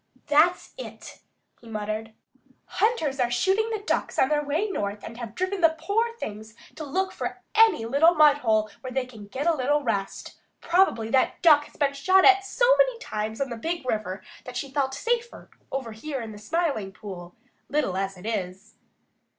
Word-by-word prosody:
"That's 325 +4 +3
it," - - -9 0.4
he 230 - -14
muttered. 215 +1 -4 0.5
"Hunters 320 - 0
are 245 -1 +2
shooting 385 - +1
the 435 -2 -3
Ducks - - -1
on 265 - +3
their 300 -1 +1
way 305 +9 0
north 205 - -3
and 230 - -8
have 235 -2 -7
driven 370 +1 -2
the 325 -1 +4
poor 450 +8 0
things 215 - -7 0.2
to 315 - -7
look 380 +7 -1
for - - -5
any 435 - +5
little 295 +8 +4
mudhole 250 -9 +4
where 255 - -6
they 260 0 -1
can 220 -5 -12
get 265 +8 -4
a 340 - +4
little 290 +1 +1
rest. 200 -5 -3 0.2
Probably 335 -11 +2
that 265 - +1
Duck 300 -3 +6
has - - -18
been 280 -1 +1
shot 375 +7 +4
at 390 0 +7
so 485 +5 +1
many - - +3
times 215 - -4
on 275 -2 -2
the 235 - -4
Big 330 +4 -3
River 210 -5 -3 0.2
that 250 -1 -7
she 275 0 -4
felt 270 -1 -1
safer 470 +9 -3 0.2
over 260 -4 -3
here 270 +6 -5
in 225 -2 -6
the 210 - -10
Smiling 275 - -1
Pool, 180 -3 -9 0.3
little 290 -11 0
as 195 0 -2
it 180 - -12
is." 200 -1 -4
275 Hz, 185 wpm, -26 LUFS, 220-345 Hz, 0.5 s, at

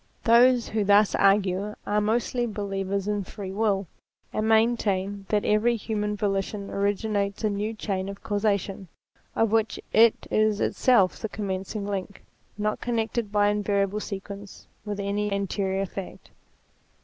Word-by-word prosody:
Those 240 +1 +5
who 215 -1 0
thus 205 +1 +4
argue 200 +1 +2
are 210 +1 +1
mostly 240 +3 0
believers 200 -2 -3
in 205 -1 -1
Free 190 0 -7
Will, 200 -1 0 0.5
and 215 +1 0
maintain 205 -4 +1
that 210 -1 +1
every 215 +3 +3
human 210 -1 -2
volition 200 0 -2
ori 200 +1 +1
ginates 200 -1 -2
a 215 - +2
new 210 +2 -2
chain 195 -2 -3
of 200 0 -9
causation, 200 -2 -1 0.5
of 225 -2 +2
which 225 -1 +1
it 225 0 +5
is 215 -1 +2
itself 230 -8 +3
the 220 - -4
commencing 200 0 -4
link, 200 -1 -5 0.3
not 210 0 -1
connected 225 -2 -1
by 205 0 +3
invariable 205 -1 0
sequence 200 0 -8 0.2
with 205 -1 -4
any 200 +1 -1
anterior 195 0 -1
fact. 195 0 -9
205 Hz, 140 wpm, -26 LUFS, 200-215 Hz, 0.5 s, Those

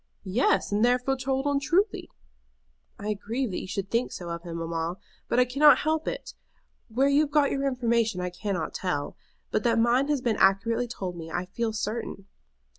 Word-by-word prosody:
"Yes; 195 -1 +1
and 205 +2 +2
therefore 250 +2 +2
told 265 +1 -1
untruly." 350 +7 +1 0.9
"I 210 +1 -2
grieve 225 +4 -3
that 180 - -2
you - - -7
should 195 +1 -4
think 235 +2 +1
so 175 -2 -6
of 170 0 -4
him, 170 -1 -6
mamma; 165 +1 -3 0.3
but 245 - +2
I 250 - +5
cannot 285 +4 +6
help 315 +1 -1
it. - - -4 0.6
Where 255 +5 +2
you 280 +1 +4
have 305 - 0
got 290 -1 +3
your 275 0 0
information 235 -5 +1
I 180 0 -2
cannot 180 -2 -3
tell. 160 -6 -2 0.4
But - - +1
that 230 -1 +3
mine 240 +4 +3
has 295 -2 +1
been 235 -4 0
accurately 230 +5 +3
told 190 -6 -5
to 175 - -10
me 165 0 -7
I 175 +2 -2
feel 225 +4 -2
certain." 215 -2 -4
230 Hz, 190 wpm, -27 LUFS, 190-270 Hz, 0.9 s, cannot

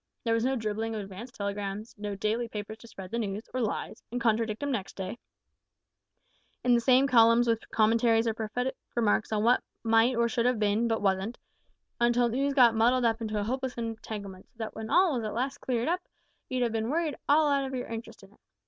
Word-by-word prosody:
There 230 - +1
was 230 0 +1
no 265 +2 +1
dribbling 220 -1 -2
of 215 - -3
advance 200 +5 -8
telegrams; 200 +1 -4
no 205 -1 -5
daily 220 +4 -1
papers 215 0 -7
to 230 - -13
spread 190 -4 -10
the 235 - -1
news 205 -1 -3
(or 255 - -1
lies), 215 - -3
and 245 - -2
contradict 225 +1 0
'em 285 - -1
next 205 -7 -3
day, 195 +5 -5 1.4
in 245 - +4
the 240 - +5
same 260 +2 +5
columns 235 -1 +5
with 225 -1 0
commentaries 225 +1 +3
or 225 - +1
prophetic 230 +4 -3 0.2
remarks 220 -2 +1
on 215 -1 +1
what 245 +2 +4 0.2
might 225 +2 +4
or 235 0 +2
should 235 +1 +1
have 250 -1 +2
been, 210 +2 +1
but 225 -2 -1
wasn't, 195 +4 0 0.6
until 240 0 +3
news 275 +4 0
got 245 -4 +6
muddled 240 +3 +3
up 230 0 +1
into 215 -1 -2
a - - -1
hopeless 260 +3 -3
entanglement, 215 -4 -6
so - - -37
that 220 -1 -5
when 220 0 -6
all 360 +1 +4
was 240 -3 -2
at 215 - -4
last 260 +3 -2
cleared 240 -1 -1
up 355 +2 0 0.5
you'd 250 -2 0
been 225 0 -1
worried 320 0 0 0.2
out 290 -2 +4
of 265 - -5
all - - -4
your 245 - -4
interest 230 0 -8
in - - -16
it! - - -27
230 Hz, 215 wpm, -29 LUFS, 215-245 Hz, 1.4 s, got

